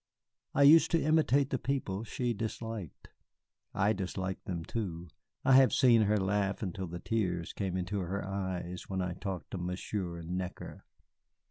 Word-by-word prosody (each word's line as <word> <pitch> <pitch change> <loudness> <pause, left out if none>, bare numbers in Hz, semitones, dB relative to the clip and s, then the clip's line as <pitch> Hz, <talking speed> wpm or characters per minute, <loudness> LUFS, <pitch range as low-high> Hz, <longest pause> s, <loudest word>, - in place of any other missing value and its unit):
I 140 - +5
used 155 +3 +8
to 165 - +3
imitate 145 -3 +3
the 130 - 0
people 115 -7 -2
she 120 +1 -2
disliked. 110 -4 -6 0.6
I 105 +2 +2
disliked 95 -1 -4
them, 85 -3 -4
too. 90 -6 -4 0.4
I - - +4
have 130 0 +7
seen 120 -3 +5
her 105 0 +3
laugh 100 +1 0
until 95 -1 -4
the 85 +1 -6
tears 90 -5 -2
came 95 -3 -2
into 95 +3 -2
her 95 +2 -3
eyes 95 -2 -4
when 95 -1 -1
I 90 -1 -2
talked 95 0 -6
of 95 - -3
Monsieur 90 -1 -4
Necker. 90 +2 -5
95 Hz, 155 wpm, -31 LUFS, 90-115 Hz, 0.6 s, used